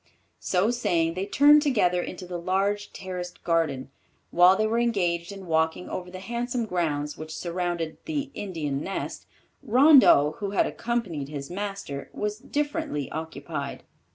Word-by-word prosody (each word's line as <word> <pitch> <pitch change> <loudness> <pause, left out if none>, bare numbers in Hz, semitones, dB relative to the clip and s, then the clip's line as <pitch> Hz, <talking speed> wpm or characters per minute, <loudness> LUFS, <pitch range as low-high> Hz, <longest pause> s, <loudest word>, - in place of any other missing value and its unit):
So 190 +5 +1
saying, 170 -9 +1
they 185 +3 -3
turned 295 +6 +6
together 205 - +2
into 180 +1 -7
the 175 -1 -5
large 195 +3 0
terraced 180 -2 -7
garden. 155 -6 0 0.4
While 180 +2 +6
they 215 - +1
were 225 +2 +1
engaged 180 -7 0
in 195 -1 -9
walking 160 +1 0
over 180 0 -5
the 185 - -8
handsome 240 +3 -2
grounds 150 -6 -2
which 155 0 -7
surrounded 175 -2 -3
"The 290 -3 -3
Indian 155 -8 -3
Nest," 195 - -5 0.3
Rondeau, 255 - +6
who 200 - -2
had - - +5
accompanied 195 -13 -3
his 145 0 -6
master, 195 -8 -5
was 210 0 -3
differently 290 - -2
occupied. 155 -2 -5
180 Hz, 145 wpm, -26 LUFS, 160-215 Hz, 0.4 s, turned